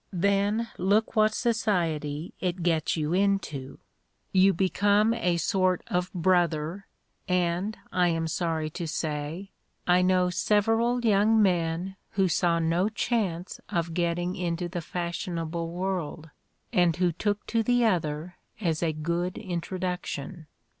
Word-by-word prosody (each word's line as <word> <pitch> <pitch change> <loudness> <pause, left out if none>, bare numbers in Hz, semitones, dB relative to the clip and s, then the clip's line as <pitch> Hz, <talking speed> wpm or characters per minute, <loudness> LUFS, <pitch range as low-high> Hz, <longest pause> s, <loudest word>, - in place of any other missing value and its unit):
Then 200 +5 +1
look 205 +5 +2
what 215 0 +4
society 170 - -1
it 180 -1 -2
gets 165 -2 +1
you 155 +1 -1
into 185 -9 0 0.5
you 190 +1 +5
become 205 +4 +2
a 180 -7 0
sort 185 +1 +1
of 180 0 -1
brother; 175 0 +1 0.4
and, 180 +3 0
I 180 -1 +3
am 165 -1 0
sorry 160 -1 -1
to 170 0 -4
say, 155 +4 -3 0.3
I 180 0 +4
know 180 0 +3
several 225 +6 +2
young 215 +1 +4
men 180 -1 +1 0.2
who 195 -1 +3
saw 170 0 +2
no 165 +4 +1
chance 200 -6 -2
of 170 -1 -1
getting 175 +1 -1
into 175 -1 -2
the 175 0 -4
fashionable 170 -1 -3
world, 175 -3 -3 0.4
and 175 -2 +3
who 180 0 +2
took 205 +5 -2
to 230 - +1
the 245 +1 +2
other 165 -4 -1 0.2
as 165 -7 -1
a 165 -2 +1
good 170 +4 -2
introduction. 180 -3 -4
180 Hz, 130 wpm, -27 LUFS, 165-195 Hz, 0.5 s, you